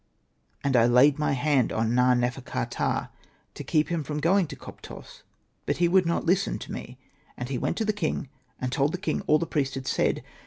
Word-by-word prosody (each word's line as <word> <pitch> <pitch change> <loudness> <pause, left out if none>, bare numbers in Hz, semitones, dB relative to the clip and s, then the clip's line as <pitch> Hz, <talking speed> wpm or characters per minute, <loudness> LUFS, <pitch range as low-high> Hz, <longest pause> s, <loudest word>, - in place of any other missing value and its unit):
And 140 - +1
T 125 - +5
laid 135 +4 +5
my 150 - +1
hand 140 -1 +2
on 110 +1 0
Na.nefer.ka.ptah, 125 - 0 0.4
to - - -7
keep 155 0 +1
him 170 -3 -1
from 150 +2 -4
going 180 +3 +3
to - - -8
Koptos, - - -12 0.5
but - - 0
he 175 - +3
would 180 0 +3
not 170 - 0
listen 190 +3 +1
to - - -9
me; 125 - -7 0.4
and 125 +1 -5
he 130 -3 -2
went - - -1
to 225 - 0
the 215 - +1
king, 160 -6 -2 0.3
and 130 0 -2
told 140 +3 +1
the - - -1
king 190 - -2
all 150 - +5
that 170 - -2
the - - -19
priest 135 -3 0
had 135 -1 -5
said. - - 0
145 Hz, 210 wpm, -26 LUFS, 125-170 Hz, 0.5 s, T